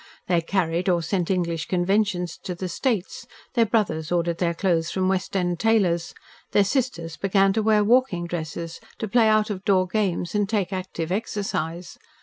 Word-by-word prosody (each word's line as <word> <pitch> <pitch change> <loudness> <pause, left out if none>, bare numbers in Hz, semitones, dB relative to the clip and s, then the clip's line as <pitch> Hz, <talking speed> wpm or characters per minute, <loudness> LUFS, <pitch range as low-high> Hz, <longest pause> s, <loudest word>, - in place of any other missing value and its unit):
They 175 -2 +2
carried 175 0 0
or 175 -2 +2
sent 175 0 -1
English 170 -4 -1
conventions 180 -1 0
to 180 - -5
the 185 +2 -4
States, 205 +1 -2 0.3
their 230 -2 +3
brothers 170 -8 0
ordered 170 -1 0
their 170 -2 0
clothes 170 -3 +1
from 185 +1 0
West 190 +1 -1
End 175 -2 -1
tailors, 190 -6 +1 0.4
their 205 - +5
sisters 195 - -2
began 195 0 +3
to 220 - +1
wear 215 -1 +3
walking 230 -6 +2
dresses, 165 0 -5 0.2
to 220 - -3
play 225 +2 +4
out 215 0 +3
of 190 -2 -5
door 190 -2 +3
games 185 -3 -1
and 205 -1 +1
take 200 -4 0
active 180 -3 -4
exercise. 185 -5 -3
185 Hz, 170 wpm, -24 LUFS, 170-210 Hz, 0.4 s, their